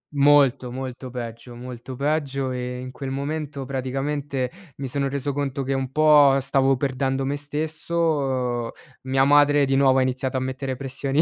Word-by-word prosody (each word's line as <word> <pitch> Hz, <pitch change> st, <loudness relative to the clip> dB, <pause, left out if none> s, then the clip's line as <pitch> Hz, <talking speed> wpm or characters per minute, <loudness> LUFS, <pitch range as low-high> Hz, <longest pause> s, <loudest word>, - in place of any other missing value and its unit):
Molto, 140 Hz, -3 st, +4 dB
molto 130 Hz, 0 st, -6 dB
peggio, 120 Hz, 0 st, -7 dB
molto 125 Hz, +1 st, -8 dB
peggio. 140 Hz, -1 st, -1 dB
E, 125 Hz, 0 st, -4 dB
in 130 Hz, 0 st, -7 dB
quel 135 Hz, 0 st, -6 dB
momento, 140 Hz, 0 st, -4 dB
praticamente, 135 Hz, 0 st, -2 dB, 0.2 s
mi 135 Hz, -1 st, -5 dB
sono 140 Hz, +1 st, -1 dB
reso 140 Hz, 0 st, -2 dB
conto 140 Hz, -1 st, -2 dB
che 135 Hz, +1 st, -1 dB
un 135 Hz, -1 st, -2 dB
po' 150 Hz, -2 st, +6 dB
stavo 135 Hz, 0 st, +2 dB
perdendo 135 Hz, 0 st, -1 dB
me 140 Hz, +2 st, -1 dB
stesso. 145 Hz, -5 st, -1 dB, 0.3 s
Mia 135 Hz, 0 st, +2 dB
madre 145 Hz, 0 st, +5 dB
di 135 Hz, -, +1 dB
nuovo 135 Hz, -1 st, +4 dB
ha -, -, +4 dB
iniziato 130 Hz, 0 st, -1 dB
a -, -, +1 dB
mettere 130 Hz, +1 st, -3 dB
pressioni 135 Hz, +2 st, -1 dB
135 Hz, 160 wpm, -24 LUFS, 130-145 Hz, 0.3 s, po